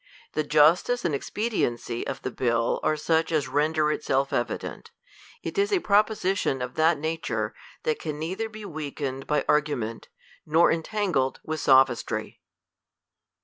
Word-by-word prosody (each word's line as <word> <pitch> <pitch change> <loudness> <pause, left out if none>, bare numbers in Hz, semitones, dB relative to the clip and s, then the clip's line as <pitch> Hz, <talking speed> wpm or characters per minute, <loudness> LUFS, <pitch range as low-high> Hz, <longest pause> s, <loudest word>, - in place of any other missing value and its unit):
The 155 - +1
justice 160 +11 +3
and 165 - +1
expediency 135 - -2
of 135 - -5
the 130 - -3
bill 115 -2 0
are 155 - +1
such 160 +2 +1
as 155 -3 +1
render 150 +1 +1
it 150 - -3
self 135 +1 0
evident. 120 0 -3 0.5
It - - -3
is 405 +1 +2
a 395 - +3
propo 210 -5 +3
sition 190 -9 0
of 125 0 -5
that 160 +1 +3
nature, 160 +2 -2 0.3
that 465 -2 0
can 150 -1 -4
neither 185 +8 -3
be 215 -1 -9
weakened 145 -5 -5
by 150 - +1
argument, 140 -7 0 0.4
nor 160 +3 +4
entangled 165 -6 0
with 155 0 -3
sophistry. 130 -3 +2
155 Hz, 145 wpm, -26 LUFS, 135-180 Hz, 0.5 s, nor